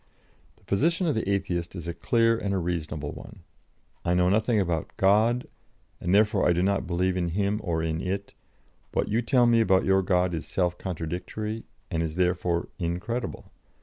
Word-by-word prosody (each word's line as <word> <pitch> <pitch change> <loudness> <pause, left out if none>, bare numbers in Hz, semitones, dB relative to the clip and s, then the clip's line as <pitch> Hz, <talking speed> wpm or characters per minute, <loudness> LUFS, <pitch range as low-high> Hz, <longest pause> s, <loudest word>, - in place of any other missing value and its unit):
The - - -29
position 165 - +1
of 155 - +2
the 110 -4 -2
Atheist 90 -3 -1
is 85 -2 -6
a 85 - -2
clear 115 +4 +2
and 100 -3 -2
a - - +1
reasonable 80 -4 -3
one: - - -11 0.6
I 85 - +1
know 90 0 +3
nothing 110 +3 +2
about 85 -5 -1
'God,' 110 +6 +3 0.5
and 90 - -2
therefore 105 0 +4
I - - +5
do 90 +1 +1
not 100 -1 +1
believe 90 +1 0
in 90 -2 0
Him 105 +1 0
or 80 -4 -1
in 80 0 -1
it; 100 +2 -3 0.6
what - - 0
you 110 +3 +2
tell 120 +1 +3
me 115 -1 +5
about 95 -3 +3
your 95 0 +4
God 90 -1 +1
is 80 - -4
self 90 -2 0
contradictory, 95 +6 -4 0.3
and 80 -2 0
is 80 -1 -3
therefore 90 -1 0
incredible. 90 +8 -3
95 Hz, 180 wpm, -27 LUFS, 85-105 Hz, 0.6 s, I